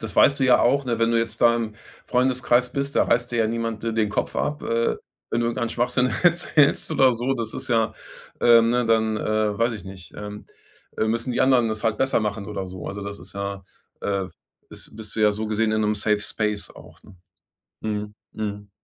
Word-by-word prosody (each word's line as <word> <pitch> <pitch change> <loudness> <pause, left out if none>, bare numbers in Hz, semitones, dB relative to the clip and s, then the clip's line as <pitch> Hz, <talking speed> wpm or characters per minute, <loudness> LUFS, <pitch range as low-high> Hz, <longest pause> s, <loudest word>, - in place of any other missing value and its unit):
das 110 -3 -6
weißt 140 0 +5
du 130 - +3
ja 125 - +5
auch, 140 +3 +3
ne, 120 -2 -1
wenn 115 0 +2
du 115 - +3
jetzt 115 -1 -3
da 115 -1 +6
im 110 -2 -3 0.3
Freundeskreis 125 -1 +2
bist, 140 0 -2
da - - +5
reißt 120 +1 +1
dir 120 - -2
ja 110 - +3
niemand 115 -1 -3
d 115 -1 -1
den 110 -2 +1
Kopf - - -2
ab, 150 0 -2
äh, 115 0 0 0.3
wenn 120 - 0
du 115 - +1
irgendeinen 115 0 -2
Schwachsinn 125 +1 +1
erzählst 170 -4 +3
oder 130 -2 +4
so, 125 +3 -1
das 115 -3 -4
ist - - -6
ja 115 -2 +2 0.5
ähm, 115 -1 +6
ne, 125 0 +2
dann, 110 -1 +2
äh 110 -1 0
weiß 115 +1 +2
ich 105 - -9
nicht, 95 -1 -11
ähm, 105 0 -8 0.5
äh, - - +1
müssen 115 +3 -1
die - - -1
anderen 125 -3 +4
das 110 +1 -4
halt 110 -1 +1
besser 135 -3 +2
machen 105 -1 -3
oder 95 -3 -4
so. 90 -1 -8
Also, 100 +1 -6
das 100 0 -6
ist - - -12
ja, 100 -1 -5 0.4
äh 100 -2 -1 0.4
bis - - -13
bist 110 -1 -9
du 110 - -2
ja 105 -1 +5
so 110 +1 -4
gesehen 110 0 0
in 110 - +1
'nem 105 0 +1
Safe 105 0 +1
Space 105 0 -2
auch, - - -16
ne? 95 - -17 0.7
Mhm. 105 -1 -3 0.2
Mhm. 105 -1 -5
115 Hz, 225 wpm, -23 LUFS, 105-120 Hz, 0.7 s, da